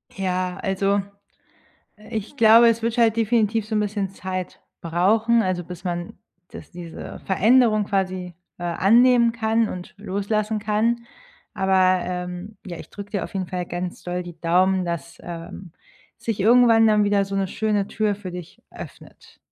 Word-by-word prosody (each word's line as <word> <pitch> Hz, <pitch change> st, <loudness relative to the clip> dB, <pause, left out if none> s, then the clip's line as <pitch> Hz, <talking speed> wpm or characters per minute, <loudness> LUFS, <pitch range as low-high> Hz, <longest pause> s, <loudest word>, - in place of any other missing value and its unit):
Ja, 185 Hz, -1 st, -2 dB
also, 195 Hz, +1 st, 0 dB, 1.1 s
ich 220 Hz, +6 st, -5 dB
glaube, 230 Hz, +1 st, +7 dB
es 230 Hz, 0 st, +1 dB
wird 230 Hz, +1 st, -1 dB
halt 225 Hz, -1 st, +4 dB
definitiv 225 Hz, -1 st, +1 dB
so 220 Hz, -, -4 dB
'n -, -, +2 dB
bisschen 205 Hz, -2 st, -2 dB
Zeit 185 Hz, -1 st, -6 dB, 0.2 s
brauchen, 215 Hz, +8 st, +2 dB
also, 185 Hz, -3 st, -2 dB
bis 180 Hz, +1 st, -10 dB
man 175 Hz, -1 st, -4 dB, 0.3 s
das -, -, -11 dB
diese 170 Hz, -2 st, -9 dB
Veränderung 215 Hz, +2 st, +3 dB
quasi, 185 Hz, -3 st, -2 dB, 0.2 s
äh, 175 Hz, -, -9 dB
annehmen 235 Hz, +7 st, +4 dB
kann 225 Hz, 0 st, +1 dB
und 180 Hz, -1 st, -8 dB
loslassen 210 Hz, +2 st, -2 dB
kann. 225 Hz, +3 st, 0 dB, 0.5 s
Aber, 185 Hz, -1 st, +3 dB
ähm, 180 Hz, +3 st, -5 dB
ja, 175 Hz, -2 st, -6 dB
ich -, -, -11 dB
drücke 205 Hz, 0 st, -9 dB
dir 200 Hz, -, -1 dB
auf -, -, -10 dB
jeden 190 Hz, -2 st, -2 dB
Fall 180 Hz, -1 st, -4 dB
ganz 175 Hz, +1 st, -5 dB
doll 180 Hz, 0 st, -3 dB
die 175 Hz, -2 st, -11 dB
Daumen, 185 Hz, +2 st, +2 dB
dass, 170 Hz, -1 st, -5 dB
ähm, 170 Hz, +1 st, -8 dB, 0.4 s
sich 225 Hz, -3 st, -4 dB
irgendwann 230 Hz, +1 st, +6 dB
dann 210 Hz, -1 st, +4 dB
wieder 205 Hz, -1 st, +2 dB
so 195 Hz, 0 st, -5 dB
'ne 195 Hz, -, 0 dB
schöne 205 Hz, 0 st, -1 dB
Tür 215 Hz, -1 st, -1 dB
für 190 Hz, -3 st, -8 dB
dich 180 Hz, -2 st, -9 dB
öffnet. -, -, -13 dB
195 Hz, 160 wpm, -23 LUFS, 180-220 Hz, 1.1 s, glaube